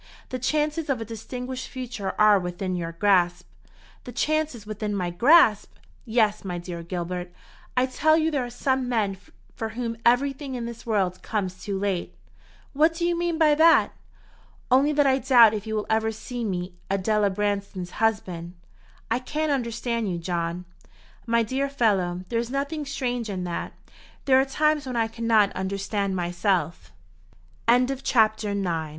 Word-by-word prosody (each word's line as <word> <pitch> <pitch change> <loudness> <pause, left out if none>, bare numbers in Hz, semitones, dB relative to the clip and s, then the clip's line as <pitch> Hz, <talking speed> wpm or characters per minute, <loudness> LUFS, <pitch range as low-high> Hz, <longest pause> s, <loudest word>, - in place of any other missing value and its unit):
The 255 - -4
chances 300 +4 0
of 265 -4 +1
a 225 - -4
distinguished 250 +3 -6
future 235 -6 -5
are 210 -1 +6
within 180 +1 -3
your 170 -1 -4
grasp." 175 - +2 0.6
"The 245 - -8
chances 300 -2 -1
within 210 -1 -3
my 180 -3 -2
grasp! 230 - +4 0.3
Yes. 220 -3 +1
My 180 -3 -4
dear 175 -1 -6
Gilbert, 175 +1 -4 0.5
I 250 - +4
tell 310 +4 +3
you 320 0 +1
there 280 -4 0
are 245 - -5
some 260 +1 -1
men 210 -5 0 0.4
for 225 - -4
whom 230 +1 -4
everything 270 +2 +1
in 240 -1 -4
this 235 0 -8
world 190 -5 0
comes 185 -4 -3
too 200 -2 -2
late." 190 - -2 0.6
"What 315 +3 +3
do 340 +1 -1
you 345 0 +1
mean 340 -1 -1
by 310 -2 +5
that?" 325 +2 +5 0.8
"Only 270 +4 +5
that 290 -1 +3
I 265 0 +3
doubt 240 -4 +6
if 215 0 -4
you 220 - -2
will 210 - -1
ever 220 0 +1
see 240 +2 -6
me 180 -3 -3 0.2
Adela 200 +2 +1
Branston's 200 -2 -2
husband." 185 -6 -1 0.6
"I 235 - +2
can't 300 +4 -2
understand 235 -4 -1
you, 175 - -2
John." 170 +1 -3 0.6
"My 230 0 +3
dear 265 +5 -1
fellow, 190 -9 0
there 230 - 0
is 235 0 -3
nothing 280 +2 -3
strange 245 -5 -2
in 185 -2 -3
that. 175 -1 -4 0.5
There 265 -1 +5
are - - 0
times 300 +1 +1
when 255 - -4
I 225 -1 +1
cannot 225 -2 +2
understand 195 +1 -2
myself." 175 -2 -1 0.8
CHAPTER 250 +2 +4
X. 265 - -9
JACOB 215 -3 +2
NOWELL. 165 -5 -2
225 Hz, 165 wpm, -25 LUFS, 190-260 Hz, 0.8 s, are